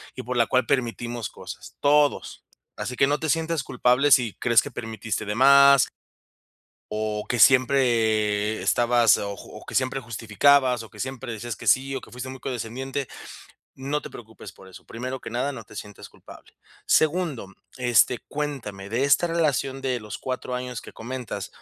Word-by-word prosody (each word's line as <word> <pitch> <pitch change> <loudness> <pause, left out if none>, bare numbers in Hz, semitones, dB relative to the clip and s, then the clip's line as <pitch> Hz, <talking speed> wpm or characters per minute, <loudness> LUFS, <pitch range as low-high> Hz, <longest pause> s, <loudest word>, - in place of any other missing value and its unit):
y - - -5
por 125 +1 -4
la 115 - +4
cual 130 0 +1
permitimos 120 -2 -2
cosas, - - -11
todos. 145 0 +1 0.3
Así 125 - -5
que 135 - +3
no 145 +1 +1
te 160 - -3
sientas 165 -2 0
culpable 125 +3 +2
si 120 -6 +5
crees 115 -2 +3
que - - -7
permitiste 110 -1 -5
de 105 - -2
más. 140 +2 +6 1.0
O 105 0 -3
que 120 - -1
siempre 110 -5 +3
estabas 120 -2 +3
o 100 0 -4
o - - -12
que - - -8
siempre 130 +1 0
justificabas 125 +2 +2
o 110 - -13
que 105 - -16
siempre 130 -2 -5
decías 115 0 -5
que - - -9
sí 135 +1 +3
o - - -2
que - - -15
fuiste 125 +1 -7
muy 130 0 -8
condescendiente, 130 +2 -4 0.7
no 140 +3 -3
te - - -9
preocupes 110 -3 -11
por 95 +2 -17
eso. 95 - -14
Primero 130 +2 -6
que - - -7
nada, 125 +5 -1
no 115 -4 -8
te - - -16
sientes 105 -2 -9
culpable. - - -16 0.3
Segundo, 155 - +1 0.3
este, 120 0 +3
cuéntame 120 -10 -5
de 120 +4 0
esta 140 +5 +3
relación 145 -5 0
de 125 -2 -1
los 105 -1 -8
4 130 -1 -4
años 125 -3 -5
que - - -12
comentas 115 -5 -6
125 Hz, 175 wpm, -24 LUFS, 110-135 Hz, 1.0 s, más